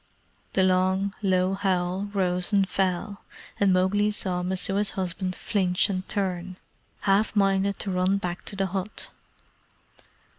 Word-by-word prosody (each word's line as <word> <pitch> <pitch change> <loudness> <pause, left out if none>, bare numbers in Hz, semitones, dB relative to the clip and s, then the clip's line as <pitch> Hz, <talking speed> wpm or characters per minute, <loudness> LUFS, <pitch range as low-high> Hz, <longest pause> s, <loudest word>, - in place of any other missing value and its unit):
The 190 - +3
long, 185 +1 +2
low 185 -1 +2
howl 190 0 -1
rose 180 -2 +1
and 200 -2 +3
fell, 195 +2 -1 0.4
and 200 -1 +4
Mowgli 190 +3 +2
saw 185 -4 -1
Messua's 195 +3 +1
husband 185 0 -2
flinch 190 -1 +1
and 185 -1 -4
turn, 185 -2 -2 0.4
half 205 +3 +2
minded 195 -1 +2
to 195 - -3
run 185 +2 +2
back 180 -2 -4
to - - -2
the 195 0 0
hut. 190 +2 -4
190 Hz, 135 wpm, -26 LUFS, 185-200 Hz, 0.4 s, and